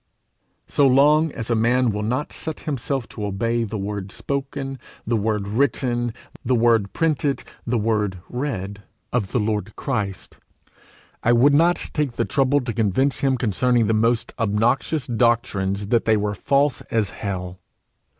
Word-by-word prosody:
So 140 - +3
long 150 +4 +4
as 115 +1 -4
a - - +3
man 120 +2 +2
will 105 0 -3
not 125 +7 -2
set 160 -2 -5
himself 135 -3 -3
to 105 - -7
obey 115 +4 0
the 110 0 -4
word 100 -1 -4
spoken, 135 0 -4 0.3
the 115 - 0
word 105 -2 -1
written, 120 0 0 0.3
the 125 +1 +2
word 115 -4 +3
printed, 150 -3 0 0.2
the 120 +1 +1
word 105 -3 0
read, 100 -7 -4 0.3
of 105 -6 0
the - - +1
Lord 105 -1 -2
Christ, 105 -8 -4 0.8
I 120 - +3
would 130 +5 +5
not 170 +4 +2
take 150 -5 0
the 115 - -1
trouble 140 0 +2
to 120 -2 -4
convince 115 +6 +1
him 135 -2 +1
concerning 120 +1 +2
the 110 - +1
most 115 +2 +1
obnoxious 115 +7 +1
doctrines 105 -4 0
that 115 -1 +2
they 110 -1 +4
were 105 0 -1
false 140 +4 +1
as 110 -3 0
hell. 95 -3 -5
115 Hz, 155 wpm, -22 LUFS, 105-135 Hz, 0.8 s, would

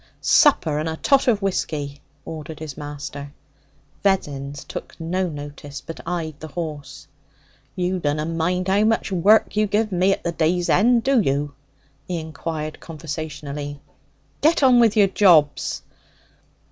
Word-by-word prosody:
'Supper 160 - +4
and 155 +1 -2
a 160 - -4
tot 275 - +3
of 215 -5 +2
whisky!' 145 -7 -2 0.2
ordered 160 0 -7
his 155 -3 -7
master. 145 -1 -7 0.7
Vessons 145 -8 -1
took - - -8
no 180 +3 -1
notice, 145 -2 -8
but 165 - -9
eyed 165 -3 -2
the 155 - -7
horse. 150 -4 -6 0.7
'You 180 +1 -1
dunna 150 -1 -1
mind 170 +3 -1
how 200 +2 +3
much 220 -1 +1
work 200 +4 +4
you 215 0 +2
give 210 +1 0
me 185 +1 +3
at - - -6
the 170 - -1
day's 170 +2 0
end, 235 +4 +4
do 270 0 +3
you?' 140 -2 -1 0.5
he 180 - -2
inquired 155 0 -5
conversationally. 150 -2 -6 0.6
'Get 315 0 +3
on 255 -2 +6
with 225 -2 +4
your 205 - +7
jobs!' 170 -7 +3
165 Hz, 145 wpm, -22 LUFS, 150-195 Hz, 0.7 s, your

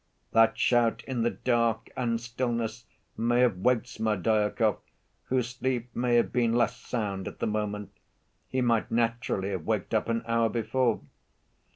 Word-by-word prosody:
That 115 0 +4
shout 115 -2 +2
in 130 -3 -2
the 120 - +3
dark 115 -3 0
and 115 -2 0
stillness 120 -1 -3 0.3
may 120 +2 +2
have 120 -7 +3
waked 120 +5 +2
Smerdyakov 110 0 +1 0.5
whose 125 -2 0
sleep 125 -2 -3
may 120 0 +2
have 120 - +2
been 120 -2 +2
less 120 0 +2
sound 105 -5 -3
at - - -7
the - - -2
moment: 105 -1 -2 0.6
he 130 - 0
might 115 -3 +2
naturally 115 -4 0
have 95 -5 -4
waked - - -1
up - - +1
an 115 0 0
hour 115 -1 +2
before. 120 +1 0
115 Hz, 155 wpm, -28 LUFS, 110-120 Hz, 0.6 s, That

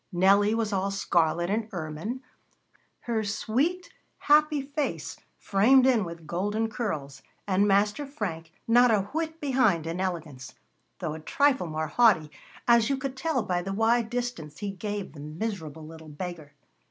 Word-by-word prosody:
Nellie 200 +4 +4
was 220 -2 -1
all 195 0 0
scarlet 175 -2 +1
and 220 +1 -1
ermine, 175 - -5 0.8
her 225 -2 -1
sweet, 270 - -1 0.2
happy 300 -1 +3
face 290 +1 -3 0.2
framed 250 +7 +4
in 245 -5 +4
with 170 -1 -9
golden 205 +7 -1
curls, 175 - -4 0.3
and 200 +1 +3
Master 205 +8 +2
Frank 170 - -5 0.2
not 245 +2 +6
a 215 -3 +3
whit 320 0 -3
behind 250 - +2
in 165 +3 -3
elegance, 155 -8 -5 0.4
though 170 -4 -3
a 160 - -7
trifle 270 - +1
more 155 0 -2
haughty, 190 -11 +4 0.4
as 235 -2 +5
you 275 - +1
could 270 0 -4
tell 265 -2 -1
by 180 -1 -1
the 195 +2 -4
wide 225 +2 +2
distance 240 -12 -4
he 205 -1 -4
gave 205 -3 -5
the 150 - -12
miserable 160 -1 -5
little 160 0 -11
beggar. 155 -1 -7
205 Hz, 155 wpm, -27 LUFS, 165-245 Hz, 0.8 s, not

